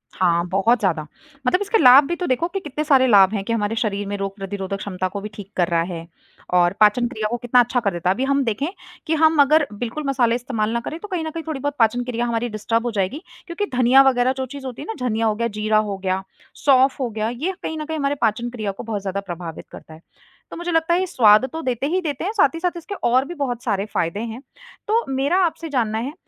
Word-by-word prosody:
हाँ, 170 -2 +2
बहुत 210 +6 +2
ज़्यादा 175 -6 0 0.5
मतलब 365 +9 +2
इसके 410 +2 +2
लाभ 260 - +8
भी 345 - -1
तो 355 0 -3
देखो 255 +6 +1
कि 390 +2 -4
कितने 300 -3 -4
सारे 270 -4 +4
लाभ 200 -3 +6
हैं 200 -2 -2
कि 230 - -1
हमारे 215 -1 -1
शरीर 205 -3 -2
में 205 - -3
रोग 195 0 -4
प्रतिरोधक 195 -1 -5
क्षमता 185 -2 -3
को 200 +2 -6
भी 210 - -6
ठीक 200 -1 -10
कर 175 -2 +2
रहा 170 -1 +1
है 165 0 -7 0.5
और 175 0 +4
पाचन 215 +3 +4
क्रिया 220 -4 -3
को 240 - -2
कितना 245 +1 +2
अच्छा 245 +1 +2
कर 205 -4 0
देता 175 +1 -1
है। - - +4
अभी 245 +7 -3
हम 275 0 +1
देखें 250 +5 -1 0.4
कि 320 - +1
हम 315 0 +4
अगर 295 +1 +4
बिल्कुल 240 +8 -5
मसाले 245 -4 +2
इस्तेमाल 235 -4 -2
ना 235 - 0
करें 320 - -5
तो 420 - -8
कहीं 365 -5 -3
न - - -2
कहीं 330 +1 -6
थोड़ी 310 -4 -3
बहुत 285 +1 -3
पाचन 235 +2 +3
क्रिया 240 -1 -2
हमारी 235 0 -1
डिस्टर्ब 225 +2 -1
हो 240 - -1
जाएगी। 210 - -2 0.3
क्योंकि 360 +4 -2
धनिया 255 +2 +6
वग़ैरह 250 0 +1
जो 265 - -2
चीज़ 275 +1 -9
होती 255 -2 -6
है - - -7
ना, 250 - -4
धनिया 225 -1 0
हो 215 -1 +1
गया, 235 +1 -1
जीरा 215 0 0
हो 210 -2 0
गया, 190 0 -2 0.4
सौंफ 265 -1 +4
हो 255 -3 -1
गया, 220 0 -2
ये 290 +11 -3
कहीं 320 - -3
न 305 - -4
कहीं 320 +1 -4
हमारे 280 -1 0
पाचन 235 +1 0
क्रिया 215 -4 -4
को 195 - -9
बहुत 215 -3 -4
ज़्यादा 195 0 -3
प्रभावित 170 -2 -6
करता 160 - -12
है। 160 - -14 0.5
तो - - -7
मुझे 345 +1 -3
लगता 325 +1 +2
है 350 - +3
ये 375 - 0
स्वाद 215 -6 +5
तो 325 - -4
देते 255 -2 -2
ही 360 +5 +1
देते 295 -5 -3
हैं, 390 - -1
साथ 290 -9 +3
ही - - -4
साथ 355 0 -1
इसके 345 +4 -7
और 255 +3 +3
भी 345 - -7
बहुत 245 -3 -2
सारे 200 -4 -1
फ़ायदे 170 +4 -1
हैं। 235 +4 -8 0.5
तो 450 +2 +2
मेरा 270 +6 +1
आपसे 325 0 -4
जानना 230 -6 0
है 255 +6 -4
240 Hz, 265 wpm, -21 LUFS, 205-285 Hz, 0.5 s, लाभ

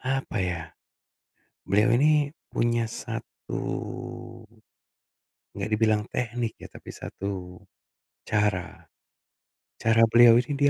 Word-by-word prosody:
apa 135 -3 -2
ya, 90 -3 -1 1.0
beliau 105 +5 +3
ini 150 +3 +3 0.2
punya 120 0 +1
satu - - -7 2.0
nggak - - -4
dibilang 110 -1 +3
teknik 120 -2 -2
ya, - - -10
tapi - - -12
satu 90 -2 -6 0.7
cara. 105 -5 -1 1.0
Cara 115 0 +4
beliau 120 0 +8
ini 125 +4 0
dia 145 0 +4
115 Hz, 95 wpm, -26 LUFS, 105-125 Hz, 2.0 s, beliau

